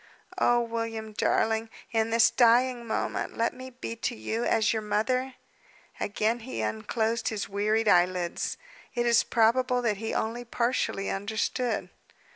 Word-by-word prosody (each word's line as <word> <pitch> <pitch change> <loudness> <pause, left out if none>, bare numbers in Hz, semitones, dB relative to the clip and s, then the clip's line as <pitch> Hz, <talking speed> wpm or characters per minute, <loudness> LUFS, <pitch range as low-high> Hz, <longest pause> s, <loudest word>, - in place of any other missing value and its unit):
"Oh, 240 0 +4
William, 230 -2 -4
darling! 225 +1 +1 0.2
in 225 -1 +1
this 230 0 +5
dying 240 0 +3
moment 220 - -2
let 230 +1 +1
me 255 0 -9
be 245 -2 -6
to - - -2
you 220 - -3
as 225 -1 +2
your 220 - -1
mother!" 250 +5 0 0.6
Again 220 +3 0
he 230 - -5
unclosed 220 - -1
his 215 -2 -2
wearied 215 +2 0
eyelids. 180 -2 +2 0.4
It 240 0 +1
is 235 -1 +5
probable 245 +2 +2
that 215 -4 +1
he 225 +2 -4
only 230 +2 -2
partially 235 -4 -1
understood. 220 +4 -2
225 Hz, 140 wpm, -28 LUFS, 215-240 Hz, 0.6 s, this